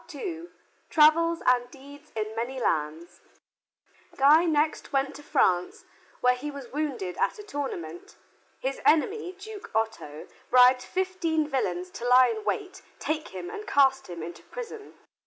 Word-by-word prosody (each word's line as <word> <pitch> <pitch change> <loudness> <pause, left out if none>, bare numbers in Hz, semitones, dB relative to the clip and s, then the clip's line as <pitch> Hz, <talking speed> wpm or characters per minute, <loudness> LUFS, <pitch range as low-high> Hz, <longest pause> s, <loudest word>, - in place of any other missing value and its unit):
II 340 -5 -5 0.4
TRAVELS 330 +2 +4
AND 245 -1 +3
DEEDS 285 +3 -14
IN 215 0 -3
MANY 245 +3 -3
LANDS 160 -4 -2 1.0
Guy 300 +5 +6
next 310 -1 0
went 275 0 0
to - - -11
France, 180 -10 +1 0.4
where 250 0 +5
he 260 +4 -5
was 280 -4 -9
wounded 275 -12 -3
at - - 0
a 420 - -9
tournament. 175 - -6 0.4
His 270 +1 -3
enemy, 365 +4 +2
Duke 415 +1 -9
Otto, 220 -9 -2 0.2
bribed 250 0 +6
fifteen 345 -3 -1
villains 185 -10 -2
to 240 - -5
lie 250 0 +7
in 435 - -7
wait, 385 -3 -3 0.2
take 310 0 -3
him 180 -2 -7
and 425 - -7
cast 270 -1 +3
him 170 -2 -6
into 170 +1 -8
prison. 455 -3 -9
275 Hz, 145 wpm, -27 LUFS, 225-330 Hz, 1.0 s, lie